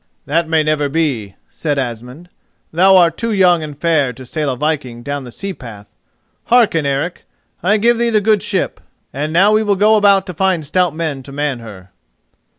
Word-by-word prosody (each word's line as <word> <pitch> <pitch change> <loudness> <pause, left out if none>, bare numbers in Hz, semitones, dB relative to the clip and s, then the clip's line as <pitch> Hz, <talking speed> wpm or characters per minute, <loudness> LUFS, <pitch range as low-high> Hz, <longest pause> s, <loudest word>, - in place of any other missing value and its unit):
"That 165 +3 0
may 160 -1 +2
never 150 -1 0
be," 135 -11 -2 0.2
said 150 -3 -2
Asmund; 125 +6 -5 0.4
"thou 190 +3 +5
art 170 -2 +3
too 230 0 -1
young 180 -5 +3
and 150 -2 -7
fair 155 -6 +1
to 130 +3 -12
sail 150 +3 -3
a 130 - -3
viking 135 -5 -3
down 140 0 -4
the 120 - -10
sea 195 +9 -5
path. 105 - -12 0.5
Hearken, 215 -11 +3
Eric: 140 +6 -2 0.4
I 205 +4 +2
give 235 +2 +2
thee 235 0 +1
the 220 -2 +3
good 210 -1 +2
ship, 190 -3 -2 0.3
and 150 +3 -3
now 190 +6 +4
we 215 0 +3
will 205 -2 +1
go 215 +3 +4
about 200 -2 +4
to 180 - -6
find 180 -2 0
stout 175 +1 0
men 155 -5 -3
to 140 - -12
man 145 -2 -2
her." 100 -5 -12
160 Hz, 195 wpm, -16 LUFS, 140-190 Hz, 0.5 s, thou